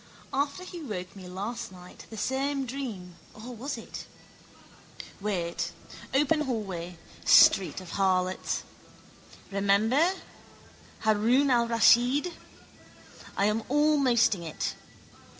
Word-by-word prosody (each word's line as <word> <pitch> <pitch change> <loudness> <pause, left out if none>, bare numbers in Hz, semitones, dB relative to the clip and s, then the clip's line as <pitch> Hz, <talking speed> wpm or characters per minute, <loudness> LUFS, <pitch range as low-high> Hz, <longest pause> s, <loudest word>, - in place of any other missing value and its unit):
After 280 +6 -1
he 355 -2 -8
woke 190 - -6
me 185 -2 -10
last 205 +5 -5
night 180 -1 -13
same 270 +5 -1
dream 225 -10 -6 0.2
or 240 +3 -9
was 265 +6 -4
it? - - -9 1.1
Wait. 185 -5 -2 0.4
Open 295 +3 +2
hallway. 190 - -4 0.3
Street 190 - +6
of 185 -2 -10
harlots. 185 -1 0 0.9
Remember. 215 - +3 0.9
Haroun 230 +6 +3
al 235 -1 +3
Raschid. 240 - +4 1.0
I 200 - +3
am 210 +2 +1
almosting 260 - +3
it. 160 -2 -3
225 Hz, 95 wpm, -28 LUFS, 190-270 Hz, 1.1 s, Street